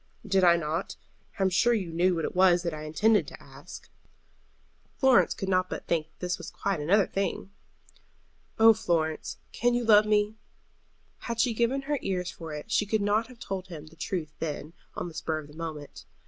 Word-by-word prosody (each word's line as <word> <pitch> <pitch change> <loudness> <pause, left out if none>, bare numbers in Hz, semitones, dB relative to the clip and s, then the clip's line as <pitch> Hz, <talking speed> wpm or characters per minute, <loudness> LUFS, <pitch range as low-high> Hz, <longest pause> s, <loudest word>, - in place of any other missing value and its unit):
"Did 195 -2 +2
I 170 -1 +6
not? 165 +2 -3 0.4
I 195 - 0
am 190 - +2
sure 240 +6 +3
you 185 -6 -3
knew 180 +2 +2
what 165 -2 -1
it - - -5
was 180 -1 +4
that 170 -2 -2
I 155 0 -6
intended 210 +8 +2
to - - -11
ask." - - -12 1.1
Florence 265 -3 +4
could 195 - -5
not 185 -1 +1
but - - -6
think 160 -2 0
that - - -38
this 180 -1 -2
was - - -7
quite 195 -4 -2
another 185 +7 +3
thing. 195 0 -3 1.1
"Oh, 225 0 +8
Florence, 165 -7 -1
can 240 +1 +1
you 240 - 0
love 210 -1 +6
me?" 210 0 +2 0.9
Had 235 -1 -5
she 235 0 +3
given 240 +4 0
her 290 0 -1
ears 180 -2 -2
for 165 -2 -9
it 150 +9 -7
she 210 - +2
could 215 0 0
not 210 +3 +1
have 250 -1 -14
told 190 -4 -5
him 160 -4 -9
the 155 +1 -16
truth 160 -2 -4
then, 150 0 -5 0.2
on - - -4
the 170 - -9
spur 160 0 -2
of 155 -2 -8
the 150 - -15
moment. 155 -2 -7
185 Hz, 205 wpm, -28 LUFS, 165-215 Hz, 1.1 s, Oh